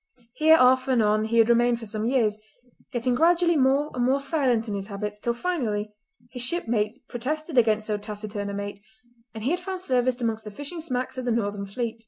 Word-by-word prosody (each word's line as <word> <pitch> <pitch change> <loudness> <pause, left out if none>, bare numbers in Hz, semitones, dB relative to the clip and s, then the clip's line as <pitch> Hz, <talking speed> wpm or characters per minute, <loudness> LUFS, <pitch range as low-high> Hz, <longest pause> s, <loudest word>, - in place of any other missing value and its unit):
Here 315 +4 +5
off 255 0 +4
and 255 -2 +2
on 215 +1 +2
he 230 +1 0
had 225 -1 +6
remained 240 0 +3
for 230 - -8
some 215 +1 -3
years, 225 -4 +1 0.5
getting 245 +1 0
gradually 340 +5 +3
more 275 +2 +2
and 245 - -1
more 265 +3 +2
silent 270 -6 0
in 210 - -3
his 195 -1 -4
habits, 210 0 -5
till 235 +2 -1
finally 230 -10 -2 0.4
his 250 -1 -5
shipmates 235 -6 0
protested 305 +6 -4
against 220 -3 +3
so 210 -1 -1
taciturn 210 -1 -5
a - - -4
mate, 200 0 -5 0.6
and 220 - -6
he 265 - +1
had 355 - 0
found 370 0 -5
service 255 -5 +1
amongst 225 -2 -2
the 210 - -7
fishing 290 - -7
smacks 255 -3 -3
of 255 - -5
the 245 - +1
northern 205 -3 -1
fleet. 230 +2 -4
240 Hz, 210 wpm, -25 LUFS, 215-265 Hz, 0.6 s, had